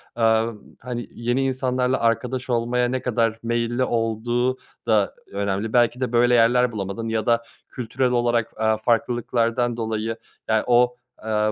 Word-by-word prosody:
aaa, 115 Hz, 0 st, +2 dB, 0.3 s
hani, 120 Hz, -1 st, -5 dB
yeni 120 Hz, +3 st, -1 dB
insanlarla 130 Hz, -1 st, 0 dB
arkadaş 125 Hz, +3 st, -1 dB
olmaya 120 Hz, +1 st, +1 dB
ne 130 Hz, +1 st, -2 dB
kadar 115 Hz, -2 st, 0 dB
meyilli 120 Hz, +1 st, 0 dB
olduğu 120 Hz, +2 st, 0 dB, 0.3 s
da 110 Hz, -3 st, +2 dB, 0.2 s
önemli. 100 Hz, +2 st, -2 dB
Belki 120 Hz, +1 st, +3 dB
de 125 Hz, -3 st, -1 dB
böyle 120 Hz, 0 st, +4 dB
yerler 120 Hz, +1 st, +4 dB
bulamadın 100 Hz, +1 st, -4 dB
ya 110 Hz, -1 st, -1 dB
da 115 Hz, 0 st, +2 dB, 0.3 s
kültürel 125 Hz, +1 st, -1 dB
olarak, 120 Hz, -2 st, +1 dB
aaa, 110 Hz, 0 st, +2 dB
farklılıklardan 120 Hz, +1 st, 0 dB
dolayı, 110 Hz, 0 st, -2 dB, 0.3 s
ya, 110 Hz, -1 st, +2 dB
o, 125 Hz, 0 st, +4 dB, 0.2 s
aaa, 110 Hz, -1 st, 0 dB
120 Hz, 140 wpm, -23 LUFS, 110-125 Hz, 0.3 s, böyle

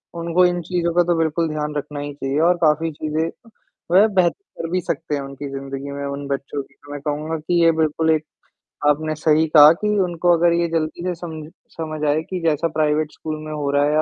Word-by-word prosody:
उनको 170 Hz, +2 st, +2 dB
इन 175 Hz, 0 st, +1 dB
चीज़ों 170 Hz, 0 st, -1 dB
का 175 Hz, -, +5 dB
तो 175 Hz, 0 st, +1 dB
बिल्कुल 165 Hz, 0 st, 0 dB
ध्यान 150 Hz, 0 st, -3 dB
रखना 145 Hz, 0 st, -4 dB
ही 145 Hz, 0 st, -5 dB
चाहिए 140 Hz, +1 st, -2 dB
और 180 Hz, -, +3 dB
काफ़ी 160 Hz, +1 st, +2 dB
चीज़ें, 155 Hz, +2 st, -2 dB, 0.6 s
वह 195 Hz, +5 st, +6 dB
बेहत 185 Hz, -5 st, +2 dB, 0.3 s
कर 165 Hz, -, -3 dB
भी 185 Hz, 0 st, +1 dB
सकते 160 Hz, -2 st, -3 dB
हैं 140 Hz, -, -3 dB
उनकी 140 Hz, +1 st, -7 dB
ज़िंदगी 135 Hz, +1 st, -6 dB
में 140 Hz, 0 st, -5 dB
उन 140 Hz, 0 st, -5 dB
बच्चों 140 Hz, +1 st, -3 dB
की। -, -, -25 dB
तो 145 Hz, -, -15 dB
मैं 145 Hz, -, -6 dB
कहूँगा 150 Hz, +2 st, -3 dB
कि 170 Hz, +2 st, +1 dB
ये 165 Hz, -, +6 dB
बिल्कुल 160 Hz, +1 st, +1 dB
एक, 155 Hz, -1 st, +1 dB, 0.7 s
आपने 155 Hz, +1 st, 0 dB
सही 155 Hz, +1 st, +2 dB
कहा 150 Hz, 0 st, +10 dB
कि 210 Hz, 0 st, +1 dB
उनको 175 Hz, -1 st, +2 dB
अगर 170 Hz, +1 st, +3 dB
ये 170 Hz, 0 st, +1 dB
जल्दी 165 Hz, +1 st, -2 dB
से 180 Hz, -, -1 dB
समझ 160 Hz, -3 st, -8 dB, 0.3 s
समझ 155 Hz, -1 st, -4 dB
आए 150 Hz, +2 st, +2 dB
कि 185 Hz, -2 st, -3 dB
जैसा 165 Hz, 0 st, +1 dB
प्राइवेट 155 Hz, 0 st, +1 dB
स्कूल 155 Hz, -1 st, -5 dB
में 155 Hz, -, -6 dB
हो 145 Hz, -2 st, -2 dB
रहा 145 Hz, 0 st, +3 dB
है 150 Hz, +1 st, +2 dB
155 Hz, 225 wpm, -21 LUFS, 145-170 Hz, 0.7 s, कहा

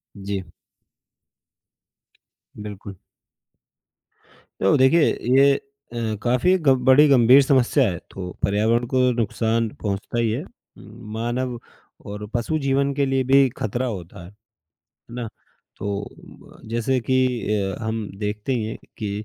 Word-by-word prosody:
जी। 100 Hz, -1 st, -4 dB, 2.2 s
बिल्कुल। 100 Hz, -2 st, -8 dB, 1.6 s
तो 95 Hz, -, +4 dB
देखिए, 130 Hz, +6 st, +5 dB, 0.4 s
ये 140 Hz, 0 st, +6 dB, 0.4 s
अ, 115 Hz, -2 st, -2 dB
काफ़ी 125 Hz, +10 st, +2 dB
ग 155 Hz, -5 st, +2 dB, 0.2 s
बड़ी 135 Hz, +3 st, +7 dB
गंभीर 130 Hz, 0 st, +7 dB
समस्या 135 Hz, 0 st, +3 dB
है 85 Hz, -, -4 dB
तो 90 Hz, -2 st, -6 dB
पर्यावरण 110 Hz, +4 st, +2 dB
को 130 Hz, -, +3 dB, 0.2 s
नुकसान 115 Hz, +1 st, 0 dB
पहुँचता 100 Hz, +3 st, -3 dB
ही 115 Hz, -2 st, +1 dB
है। 120 Hz, +6 st, -2 dB
उम, -, -, -14 dB, 0.7 s
मानव 120 Hz, +2 st, -2 dB, 0.5 s
और 105 Hz, +1 st, -6 dB
पशु 120 Hz, +7 st, -1 dB
जीवन 140 Hz, 0 st, +1 dB
के 140 Hz, 0 st, +1 dB
लिए 135 Hz, -1 st, +1 dB
भी 135 Hz, +1 st, +5 dB
खतरा 120 Hz, +5 st, -2 dB
होता 90 Hz, -6 st, -7 dB
है, -, -, -11 dB
है -, -, -20 dB, 0.8 s
ना? 120 Hz, -2 st, -4 dB, 0.5 s
तो 100 Hz, 0 st, -3 dB
अ, -, -, -15 dB
जैसे 120 Hz, +3 st, 0 dB
कि 130 Hz, -, +3 dB, 0.4 s
अ, 95 Hz, -2 st, -1 dB
हम 110 Hz, -1 st, -3 dB
देखते 105 Hz, +4 st, -2 dB
हैं 110 Hz, -2 st, -3 dB, 0.2 s
कि 105 Hz, -2 st, -3 dB
115 Hz, 130 wpm, -22 LUFS, 105-130 Hz, 2.2 s, बड़ी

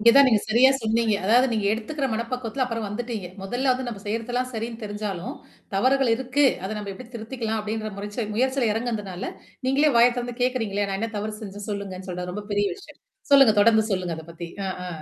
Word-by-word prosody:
இங்க 235 Hz, +2 st, +8 dB
தான் 280 Hz, 0 st, +8 dB
நீங்க 220 Hz, -, +4 dB
சரியா 235 Hz, +5 st, +6 dB
சொன்னீங்க. 225 Hz, 0 st, +2 dB
அதாவது 240 Hz, +6 st, +5 dB
நீங்க 215 Hz, -3 st, 0 dB
எடுத்துக்கிற 270 Hz, +6 st, -2 dB
மனப்பக்குவத்தில 235 Hz, +3 st, -2 dB
அப்புறம் 230 Hz, -3 st, -3 dB
வந்துட்டீங்க. 215 Hz, -1 st, -4 dB, 0.2 s
மொதல்ல 250 Hz, +7 st, +1 dB
வந்து 255 Hz, 0 st, -3 dB
நம்ம 220 Hz, -4 st, -6 dB
செய்றதெல்லாம் 240 Hz, +4 st, -1 dB
சரின்னு 230 Hz, +1 st, -4 dB
தெரிஞ்சாலும், 205 Hz, -3 st, -4 dB, 0.4 s
தவறுகள் 260 Hz, +4 st, +3 dB
இருக்கு. 260 Hz, +3 st, +1 dB, 0.2 s
அத 190 Hz, -, -3 dB
நம்ம 205 Hz, -1 st, -5 dB
எப்படி 230 Hz, +5 st, -11 dB
திருத்திக்கலாம் 225 Hz, -1 st, -3 dB
அப்டின்ற 215 Hz, +1 st, -3 dB
முறைச்ச 205 Hz, +2 st, -4 dB
முயற்சில 260 Hz, +1 st, +2 dB
எறங்குதுனால, 210 Hz, -5 st, -3 dB, 0.4 s
நீங்களே 280 Hz, +2 st, +4 dB
வாய்ய 235 Hz, +1 st, +7 dB
தொறந்து 245 Hz, 0 st, -4 dB
கேக்கிறீங்கள, 225 Hz, -6 st, 0 dB
"நான் 195 Hz, -, -2 dB
என்ன 225 Hz, 0 st, -2 dB
தவறு 210 Hz, +1 st, -3 dB
செஞ்சே 205 Hz, 0 st, -7 dB
சொல்லுங்கன்னு?" 195 Hz, -2 st, -5 dB
சொல்லுட்டு. 180 Hz, 0 st, -4 dB
அது 180 Hz, -, -5 dB
ரொம்ப 205 Hz, 0 st, -6 dB
பெரிய 205 Hz, 0 st, +2 dB
விஷயம். 390 Hz, -, -15 dB, 0.3 s
சொல்லுங்க. 270 Hz, -5 st, +8 dB
தொடர்ந்து 220 Hz, +1 st, +6 dB
சொல்லுங்க. 180 Hz, -3 st, -1 dB
அத 160 Hz, -, -8 dB
பத்தி. 170 Hz, 0 st, -7 dB, 0.2 s
ஆ -, -, -1 dB, 0.2 s
ஆ. -, -, -4 dB
225 Hz, 190 wpm, -25 LUFS, 205-250 Hz, 0.4 s, இங்க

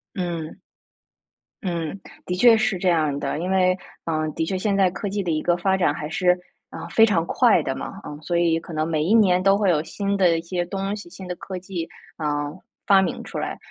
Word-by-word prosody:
嗯。 170 Hz, -4 st, -4 dB, 1.1 s
嗯， 170 Hz, -1 st, -3 dB, 0.3 s
的 180 Hz, -, -2 dB
确 230 Hz, +5 st, +7 dB
是 220 Hz, -3 st, +1 dB
这 185 Hz, -, -2 dB
样 155 Hz, -5 st, +2 dB
的， 140 Hz, 0 st, -2 dB
因 180 Hz, +3 st, -2 dB
为， 185 Hz, -1 st, +3 dB, 0.3 s
呃， 155 Hz, -1 st, -1 dB
的 160 Hz, -, -1 dB
确 190 Hz, +3 st, -2 dB
现 200 Hz, +2 st, 0 dB
在 195 Hz, -2 st, +4 dB
科 195 Hz, +3 st, -4 dB
技 200 Hz, +1 st, -2 dB
的 180 Hz, -, -3 dB
一 155 Hz, -1 st, 0 dB
个 175 Hz, +2 st, +1 dB
发 190 Hz, +2 st, +1 dB
展 175 Hz, -6 st, +2 dB
还 150 Hz, 0 st, -5 dB
是， 180 Hz, +3 st, 0 dB, 0.4 s
呃， 165 Hz, +1 st, -8 dB
非 225 Hz, +6 st, +6 dB
常 180 Hz, -7 st, +1 dB
快 225 Hz, -1 st, +4 dB
的 135 Hz, -3 st, -3 dB
嘛。 195 Hz, -, -7 dB
嗯， 145 Hz, -, -7 dB
所 170 Hz, +3 st, -1 dB
以 170 Hz, -1 st, +3 dB
可 170 Hz, -, -11 dB
能 155 Hz, 0 st, -1 dB
每 155 Hz, -2 st, 0 dB
一 185 Hz, +7 st, +2 dB
年 185 Hz, -5 st, +4 dB
都 195 Hz, +1 st, +5 dB
会 205 Hz, -2 st, +2 dB
有 155 Hz, -3 st, +2 dB
新 200 Hz, +4 st, -2 dB
的 180 Hz, -4 st, +3 dB
一 -, -, -3 dB
些 175 Hz, +1 st, -2 dB
东 195 Hz, +3 st, -3 dB
西、 205 Hz, -4 st, -10 dB
新 185 Hz, +1 st, -10 dB
的 180 Hz, -, -4 dB
科 185 Hz, +1 st, -7 dB
技， 180 Hz, -2 st, -5 dB, 0.3 s
啊， 145 Hz, -1 st, -1 dB, 0.4 s
发 195 Hz, -2 st, +6 dB
明 185 Hz, -, -2 dB
出 -, -, -7 dB
来。 -, -, -3 dB
180 Hz, 245 characters per minute, -23 LUFS, 165-195 Hz, 1.1 s, 确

